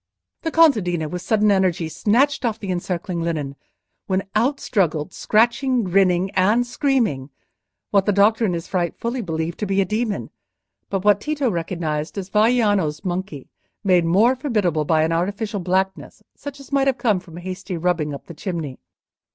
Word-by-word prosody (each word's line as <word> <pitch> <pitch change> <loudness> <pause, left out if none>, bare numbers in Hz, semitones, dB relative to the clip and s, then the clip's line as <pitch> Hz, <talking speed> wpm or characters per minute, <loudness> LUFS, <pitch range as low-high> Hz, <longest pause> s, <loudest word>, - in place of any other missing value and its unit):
The 325 - -2
contadina, 210 - +3
with 180 +3 -5
sudden 215 +1 +2
energy, 185 -4 +1
snatched 245 - +1
off 225 -3 0
the 195 -4 -4
encircling 175 -1 -3
linen, 155 -5 -3 0.5
when 190 0 0
out 255 +6 +1
struggled—scratching, 220 - +1
grinning, 185 0 +2
and 210 +6 +2
screaming—what 205 - -2
the - - +4
doctor 210 +3 +3
in 195 -5 +1
his 170 -1 -4
fright 175 -3 -2
fully 240 +2 -3
believed 160 -3 -3
to 210 - -2
be 195 0 +1
a 195 - +3
demon, 215 +2 -2 0.6
but 195 0 -2
what 205 -1 +4
Tito 290 -4 -1
recognised 165 -2 -3
as 195 -1 -5
Vaiano's 210 -8 +2
monkey, 175 -6 -4 0.4
made 180 -3 +4
more 205 +10 +4
formidable 205 - 0
by 155 0 +3
an 160 - 0
artificial 200 +5 -1
blackness, 190 +1 -2
such 285 -1 -8
as 275 - -14
might 275 -1 +2
have 270 -1 +2
come 220 -6 +1
from 170 -2 -13
a - - -8
hasty 185 0 -5
rubbing 165 -3 0
up 140 - -8
the 170 - -10
chimney. 160 -5 -5
190 Hz, 165 wpm, -21 LUFS, 170-225 Hz, 0.6 s, the